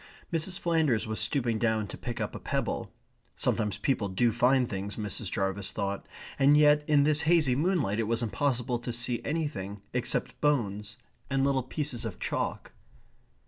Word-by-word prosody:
Mrs. 170 +3 -1
Flanders 160 -9 +1
was 110 -1 -2
stooping 115 0 +1
down 110 -2 +1
to - - -6
pick 120 -2 -5
up - - -2
a - - -6
pebble. - - -2 0.4
Sometimes 105 -3 0
people 110 -2 0
do 115 +6 +2
find 125 +2 +3
things, 100 0 -4
Mrs. 105 -1 -2
Jarvis 95 +1 -1
thought, 100 -1 -3 0.3
and 140 +2 +6
yet 150 0 +5
in 145 -2 +5
this 150 +1 +3
hazy 155 -7 +4
moonlight 145 - +1
it 110 - 0
was 115 +1 0
impossible 120 0 0
to 120 +1 -4
see 120 0 -2
anything, 125 -11 -3
except 125 -1 -1
bones, 110 -7 0 0.3
and 135 -1 +1
little 135 -1 +2
pieces 130 -1 -4
of 110 -5 -5
chalk. - - -3
120 Hz, 165 wpm, -29 LUFS, 105-145 Hz, 0.4 s, and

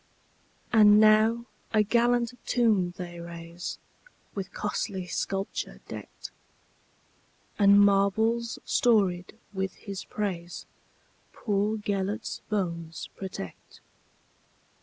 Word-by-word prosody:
And 210 -2 +7
now 220 +2 +5 0.3
a 215 -1 +5
gallant 240 +2 +2
tomb 205 -8 +2
they 175 -2 -7
raise, 170 0 -7 0.6
With 195 -2 -5
costly 200 -2 -3
sculpture 195 +2 -3
decked; - - -9 1.3
And 200 0 +7
marbles 210 +4 +3
storied 195 -6 +2 0.2
with 190 -1 -3
his 195 -2 -7
praisePoor 175 -5 -4 1.2
Gêlert's 205 +2 -2
bones 170 -5 -3
protect. 185 - -8
200 Hz, 80 wpm, -28 LUFS, 180-220 Hz, 1.3 s, And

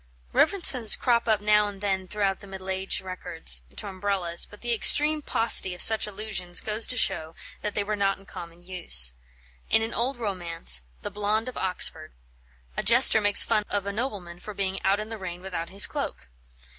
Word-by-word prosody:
References 290 - +5
crop 235 -2 -1
up 215 -2 +1
now 210 0 +2
and 200 -1 -9
then 190 -2 -3
throughout 200 -1 -3
the 200 - -15
middle 190 0 -8
age 190 +1 -3
records, 180 - -2
to - - -7
Umbrellas; 190 -3 -2
but 210 - -17
the 240 0 -1
extreme 300 +6 +5
paucity 225 -8 -1
of - - -8
such 220 -1 +3
allusions 195 -4 -4
goes 215 +1 -2
to 250 - +2
show 160 -6 0 0.3
that 210 -1 -6
they 205 - -1
were 210 +1 -4
not 195 -1 -1
in 195 - -20
common 170 -2 -12
use. 115 - 0 0.6
In 220 - +2
an 225 - -5
old 250 +3 -2
romance, 175 - -1 0.2
"The - - -6
Blonde 210 +3 -2
of 255 - -12
Oxford," 170 -4 -1 0.6
a - - -2
jester 235 -1 +5
makes 205 0 +7
fun 210 - -1
of 200 -1 -3
a 200 - -5
nobleman 200 -7 -6
for 210 +2 -10
being 195 -1 -4
out 195 +2 0
in 215 +1 -7
the 225 -1 -8
rain 175 -2 -8
without 180 -3 -7
his 195 +2 +6
cloak. - - -7
200 Hz, 195 wpm, -24 LUFS, 185-215 Hz, 0.6 s, makes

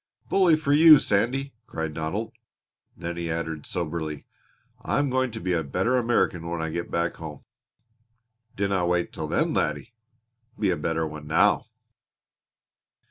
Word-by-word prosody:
"Bully 185 -4 +5
for 150 -2 0
you, 155 +1 +9
Sandy!" 130 +6 0
cried 80 -1 -4
Donald. 80 +9 -3 0.7
Then 85 0 -5
he 85 -1 -3
added 80 -2 -4
soberly: 80 -3 -4 0.6
"I - - -1
am 145 -2 +1
going 130 0 +1
to - - -7
be 90 0 -1
a 85 - +1
better 90 - 0
American 115 -9 +1
when 85 -1 -3
I 80 -1 -2
get 85 +1 -4
back 85 0 -1
home." 75 -3 -9 1.1
"Dinna 100 -2 0
wait 90 0 0
till - - -4
then, - - +1
laddie 75 - -1 0.6
be 100 -3 +1
a - - +1
better 80 +1 -1
one 75 -1 -8
now!" 80 - +3
85 Hz, 150 wpm, -25 LUFS, 80-115 Hz, 1.1 s, you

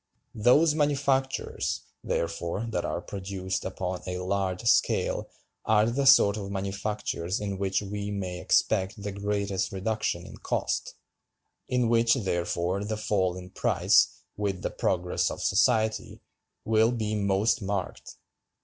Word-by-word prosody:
Those 135 +9 +4
manufactures, 140 -3 0 0.2
therefore, 85 +5 -2
that - - -1
are - - -2
produced 95 -1 -4
upon 90 -1 -4
a 90 0 -3
large 95 +2 -2
scale 115 - +2 0.3
are 110 -1 +4
the 135 +3 +1
sort 105 -6 +7
of 100 -2 -5
manufactures 100 -2 -3
in 100 -2 -4
which 95 +1 0
we 100 +1 -4
may 95 -3 -4
expect 95 +1 +1
the 100 - -3
greatest 100 -1 -2
reduction 95 -3 -2
in - - -11
cost; - - -2 0.7
in 125 -2 +1
which, 115 +1 +4
therefore, 90 -3 -1
the 110 +1 -3
fall 95 -4 0
in 90 0 -10
price, - - +4 0.3
with 100 -3 -2
the - - -1
progress 90 -1 0
of - - -5
society, 110 0 +1 0.5
will 110 +1 +4
be 110 -3 -2
most 105 +3 +1
marked. 95 -2 -4
100 Hz, 130 wpm, -27 LUFS, 95-110 Hz, 0.7 s, sort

